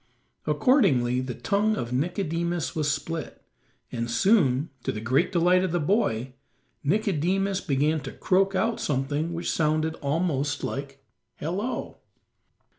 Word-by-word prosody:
Accordingly 135 - +3
the 130 -2 -5
tongue 215 +1 +1
of 120 - -4
Nicodemus 170 +2 -1
was 150 -2 +1
split, 160 +2 -4 0.5
and 115 -1 -3
soon, 145 - +3
to - - -1
the 105 - -5
great 130 - +1
delight 180 +1 +4
of 185 - -1
the 175 - +1
boy, 135 - 0 0.5
Nicodemus 195 +2 +1
began 150 -1 +1
to 135 -1 -7
croak 195 +1 +1
out 225 +3 +1
something 145 +3 -1
which 170 0 -2
sounded 155 0 +1
almost 145 -1 -1
like 140 0 -5 0.3
"Hello." 195 - -4
160 Hz, 125 wpm, -26 LUFS, 135-185 Hz, 0.5 s, delight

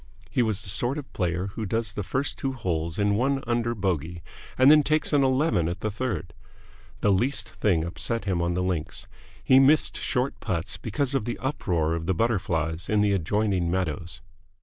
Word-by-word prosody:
He 130 - +2
was 110 -3 0
the 100 - -9
sort 120 +7 0
of 145 - -8
player 90 +1 -1
who 110 - -4
does 110 +1 -2
the 105 - -3
first 130 +8 -2
two 135 -1 -2
holes 85 -8 -2
in 100 0 +2
one 135 +5 +1
under 120 0 0
bogey 85 -4 -2 0.3
and 130 +2 +7
then 155 0 +7
takes 155 +1 +1
an 145 -1 +4
eleven 130 - +2
at 90 +1 -5
the 110 - -1
third. 110 -4 -3 0.7
The 105 - +3
least 120 +6 +2
thing 95 -7 +1
upset 100 +6 -3
him 90 -3 0
on 85 0 0
the 90 - 0
links. 90 -4 -3 0.4
He 130 - +6
missed 140 +3 +4
short 130 0 -1
putts 90 -3 -3
because 120 +8 -2
of 135 -6 0
the 120 - -3
uproar 85 - -1
of 85 0 -3
the 95 - +1
butterflies 85 -6 -1
in 105 -1 +3
the 105 -1 +3
adjoining 95 0 0
meadows. 85 -3 -3
105 Hz, 195 wpm, -26 LUFS, 85-125 Hz, 0.7 s, and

